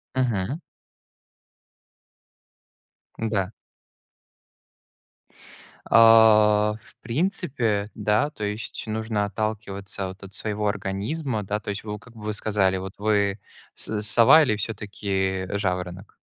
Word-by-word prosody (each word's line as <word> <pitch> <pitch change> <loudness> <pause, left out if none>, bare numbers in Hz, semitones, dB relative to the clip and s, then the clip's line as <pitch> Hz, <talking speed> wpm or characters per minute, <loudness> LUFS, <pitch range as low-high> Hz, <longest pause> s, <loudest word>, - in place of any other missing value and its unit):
Мгм. 125 - 0 2.6
Н-да. 105 -4 -1 2.3
А, 110 -2 +6
в - - -21
принципе, 125 - -1
да. 105 +6 +1
То 105 - -7
есть 105 +2 -4
нужно 110 -1 -1
отталкиваться 100 -2 -4
вот 95 +1 -10
от 100 - -11
своего 105 0 -2
организма, 105 +5 -2
да. 105 +2 -2
То 105 - -8
есть 100 - -5
вы, 105 -1 -5
в 105 - -10
как 125 -2 -17
вы 105 -1 -4
сказали: 100 -3 +1
"Вот, 95 +1 -6
вы 100 -1 +1 0.4
с 105 -1 -2
сова 120 +9 +6
или 110 -6 +1
всё-таки 100 -3 -2
жаворонок?" 90 0 -3
105 Hz, 105 wpm, -24 LUFS, 100-110 Hz, 2.6 s, А